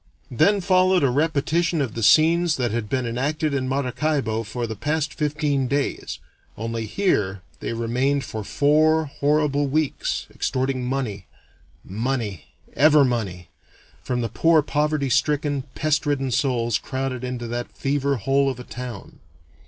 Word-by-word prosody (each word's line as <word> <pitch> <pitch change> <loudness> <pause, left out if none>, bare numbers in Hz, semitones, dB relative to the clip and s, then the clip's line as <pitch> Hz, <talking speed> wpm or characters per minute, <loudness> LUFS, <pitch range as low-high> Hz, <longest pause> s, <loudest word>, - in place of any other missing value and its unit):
Then 200 - +3
followed 185 -1 +3
a 135 - +3
repetition 160 +4 +1
of 130 -6 -1
the 115 - -4
scenes 160 +7 +4
that 120 -4 0
had 110 -2 -3
been 130 -2 -1
enacted 145 +6 -1
in 130 -2 -1
Maracaibo 135 -3 -1
for 120 +2 -4
the 110 -1 -5
past 150 +7 -1
fifteen 150 -3 0
days, 140 +2 -2 0.4
only 115 0 -3
here 100 - 0 0.2
they - - -3
remained 125 +5 0
for 110 -3 -5
four 155 +6 +3
horrible 145 0 +1
weeks, 150 +1 -1
extorting 130 -1 -1
money 120 -8 -3 0.6
money! 110 - -3 0.3
ever 150 0 +5
money! 95 -9 -3 0.5
from 125 -1 -2
the 115 - -2
poor 165 -2 +3
poverty 150 -1 0
stricken, 145 +1 +1
pest 155 0 0
ridden 135 -3 0
souls 120 -4 +1
crowded 130 -1 -4
into 125 -1 -4
that 120 +1 -4
fever 140 0 0
hole 135 +4 +1
of 130 -2 -5
a - - -7
town. 120 -4 -8
135 Hz, 145 wpm, -23 LUFS, 120-150 Hz, 0.6 s, ever